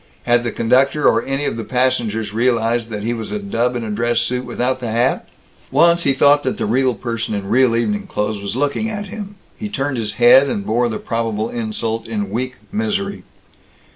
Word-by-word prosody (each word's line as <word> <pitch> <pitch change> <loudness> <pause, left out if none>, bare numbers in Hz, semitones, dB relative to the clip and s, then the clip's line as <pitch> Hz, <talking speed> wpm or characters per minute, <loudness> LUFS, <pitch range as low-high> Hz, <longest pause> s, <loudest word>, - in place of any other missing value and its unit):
Had 120 0 +2
the 120 - -2
conductor 130 +7 +2
or - - +4
any 135 +2 -2
of - - -2
the 115 - -3
passengers 115 -4 0
realized 115 0 +1
that 105 -2 -5
he 115 +2 -1
was 115 -3 -5
a 105 - -1
dub 115 +5 -1
in 120 - -3
a 110 - -4
dress 120 +2 +1
suit 125 +1 -1
without 130 +1 -1
the 120 -2 -4
hat? 120 +4 0 0.4
Once 170 0 +4
he 140 - +4
thought 145 +2 +5
that 130 - -2
the - - -1
real 125 +3 +2
person 115 -1 -3
in 100 -1 -4
real 120 +2 +3
evening 205 - -1
clothes 105 - -2
was 100 +2 -4
looking 145 - 0
at 205 -1 -4
him. 205 -1 -7 0.2
He 215 - -5
turned 135 -7 -2
his 105 -2 -2
head 130 +3 +6
and 100 -5 -3
bore 120 +2 +1
the 110 - -3
probable 115 -1 -2
insult 115 0 -3
in 105 -3 -3
weak 125 +3 -3 0.2
misery. 205 -2 -2
120 Hz, 205 wpm, -19 LUFS, 110-135 Hz, 0.4 s, head